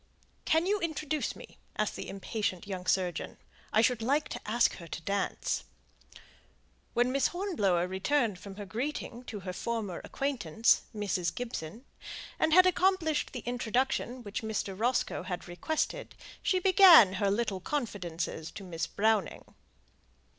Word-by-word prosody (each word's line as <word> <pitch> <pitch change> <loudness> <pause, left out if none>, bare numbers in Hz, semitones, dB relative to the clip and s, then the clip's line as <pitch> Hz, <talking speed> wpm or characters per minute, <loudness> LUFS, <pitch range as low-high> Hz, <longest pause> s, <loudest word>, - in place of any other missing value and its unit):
"Can 320 +2 +3
you 410 +2 +1
introduce 310 -3 -2
me?" - - -13 0.2
asked - - 0
the - - -6
impatient 195 -1 -3
young 185 -2 -6
surgeon. 180 -3 0 0.3
"I 215 - +4
should 235 -1 +2
like 285 +6 +1
to - - -5
ask 235 +2 +2
her 170 - -10
to 165 - -6
dance." 200 +2 -1 1.3
When 245 +1 +3
Miss 275 0 +3
Hornblower 210 - 0
returned 205 +2 0
from 195 0 -9
her 205 0 -7
greeting 240 +3 -4
to 210 -5 -6
her 185 0 -5
former 215 -3 -3
acquaintance, 235 - +1
Mrs. 195 -4 -1
Gibson, 235 - -6 0.5
and 315 - +2
had 365 +3 +8
accomplished 370 -4 +2
the 250 - -5
introduction 245 +1 -1
which 205 -2 -4
Mr. 220 -3 -2
Roscoe 240 +5 0
had 180 -1 -5
requested, 315 - -2 0.3
she 375 - +2
began 360 - +8
her 200 +1 +1
little 205 -2 0
confidences 180 - -3
to 200 - -8
Miss 170 -3 -3
Browning. 215 -3 0
225 Hz, 140 wpm, -30 LUFS, 190-285 Hz, 1.3 s, had